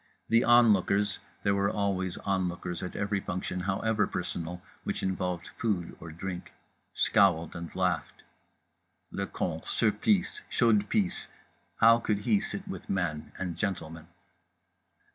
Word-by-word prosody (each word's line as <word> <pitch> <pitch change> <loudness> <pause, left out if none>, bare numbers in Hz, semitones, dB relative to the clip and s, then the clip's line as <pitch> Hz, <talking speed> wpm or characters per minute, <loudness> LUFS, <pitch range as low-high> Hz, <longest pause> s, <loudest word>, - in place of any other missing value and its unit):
The 115 +1 +5
onlookers 105 -4 +4 0.2
(there 100 - +3
were 100 0 +2
always 95 -3 -1
onlookers 90 -3 -2
at 90 - -5
every 100 0 0
function, 90 0 -3
however 100 +4 +1
personal, 90 -1 -4 0.2
which - - -3
involved 90 -2 -2
Food 100 -7 -1
or 80 0 -8
Drink) 90 +2 -6 0.4
scowled 90 -6 +3
and 85 -1 -5
laughed. 90 -4 -1 0.9
Le 100 0 -2
con, 80 -2 -3
Surplice, 205 - +1
chaude 105 -4 +3
pisse—how 110 +3 +1
could 105 -3 0
he 205 - +3
sit 195 0 -4
with 190 - -7
men 85 -6 -1
and 90 -3 -3
gentlemen? 80 -4 -3
95 Hz, 125 wpm, -29 LUFS, 90-105 Hz, 0.9 s, The